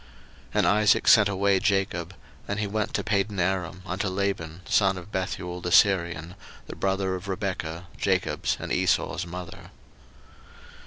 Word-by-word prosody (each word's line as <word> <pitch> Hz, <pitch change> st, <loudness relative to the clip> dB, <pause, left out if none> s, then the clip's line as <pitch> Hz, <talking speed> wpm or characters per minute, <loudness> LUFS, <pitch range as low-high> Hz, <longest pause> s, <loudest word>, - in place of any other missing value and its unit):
01:028:005 -, -, -23 dB, 0.5 s
And -, -, +3 dB
Isaac 105 Hz, 0 st, +3 dB
sent 105 Hz, -2 st, +7 dB
away 100 Hz, 0 st, +2 dB
Jacob: 95 Hz, -3 st, -1 dB, 0.3 s
and 100 Hz, +1 st, -2 dB
he 105 Hz, -, 0 dB
went 105 Hz, +1 st, -2 dB
to -, -, 0 dB
Padanaram 95 Hz, -3 st, -1 dB
unto 95 Hz, +3 st, -2 dB
Laban, 95 Hz, -3 st, -2 dB
son 95 Hz, -2 st, +2 dB
of 90 Hz, +3 st, -10 dB
Bethuel 90 Hz, -2 st, -3 dB
the 90 Hz, -, -3 dB
Syrian, 85 Hz, -3 st, +3 dB, 0.3 s
the -, -, -8 dB
brother 95 Hz, -1 st, 0 dB
of 95 Hz, +1 st, -6 dB
Rebekah, 90 Hz, -4 st, -4 dB
Jacob's -, -, 0 dB
and -, -, -4 dB
Esau's 90 Hz, 0 st, 0 dB
mother. 90 Hz, 0 st, -8 dB
95 Hz, 145 wpm, -26 LUFS, 90-100 Hz, 0.5 s, sent